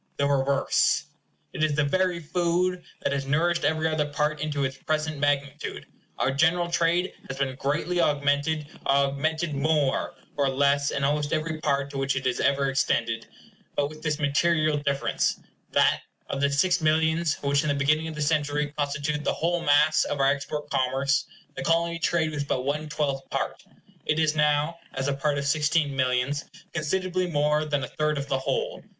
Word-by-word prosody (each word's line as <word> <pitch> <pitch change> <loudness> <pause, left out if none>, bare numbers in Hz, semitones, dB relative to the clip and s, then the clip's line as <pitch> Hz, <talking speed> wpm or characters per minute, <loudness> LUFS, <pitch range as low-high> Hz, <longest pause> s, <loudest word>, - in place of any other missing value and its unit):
The 140 - +1
reverse. 140 -1 +2 0.5
It 155 - -2
is 155 -2 +2
the 150 - +2
very 180 +4 +1
food 175 +2 0 0.2
that - - +1
has 140 -1 -2
nourished 170 +4 +1
every 160 +1 +1
other 155 -2 0
part 150 +1 0
into 145 -2 -1
its 135 0 -2
present 155 -1 -2
magnitude. 145 0 -1 0.3
Our 130 - +1
general 170 +5 +2
trade 170 +2 +1
has 135 - -6
been 135 -1 -1
greatly 165 +6 0
augmented, 145 +1 +1
and - - -11
augmented 140 +4 +1
more 140 -1 +1 0.2
or 140 -1 +2
less 140 +1 +2
in 140 - -2
almost 145 +2 +1
every 155 0 -1
part 140 -1 0
to 140 - -4
which 135 0 0
it 130 -2 -1
ever 140 0 +2
extended; 115 -4 0 0.5
but 145 0 +1
with 155 0 -12
this 155 -2 -1
material 155 +1 +2
difference, 140 -1 0 0.3
that - - +3 0.3
of 135 - -2
the 140 - +3
six 175 +6 +2
millions 160 0 +2
which 140 0 +2
in 150 - -1
the 145 - +2
beginning 150 +3 +2
of 160 - -6
the 150 - -1
century 150 -1 0
constituted 145 +1 -1
the - - +1
whole 170 +1 0
mass 150 +1 +4
of 145 - -3
our 135 0 +4
export 145 +1 -3
commerce, 135 +2 +1 0.3
the - - -6
Colony 170 0 +1
trade 160 -1 +1
was 145 -2 -2
but 130 -2 -1
one 150 +2 -2
twelfth 140 -3 -2
part, - - -3 0.5
it 150 - +2
is 155 -1 +2
now 150 +2 +2 0.2
(as 135 +1 -1
a 140 - +1
part 145 +1 0
of 140 - -2
sixteen 150 0 +1
millions) 130 +2 0 0.3
considerably 185 +3 -1
more 150 -1 +1
than 145 -2 -1
a - - -3
third 150 0 -1
of 140 0 -3
the 135 - +1
whole. - - -2
150 Hz, 180 wpm, -26 LUFS, 140-160 Hz, 0.5 s, mass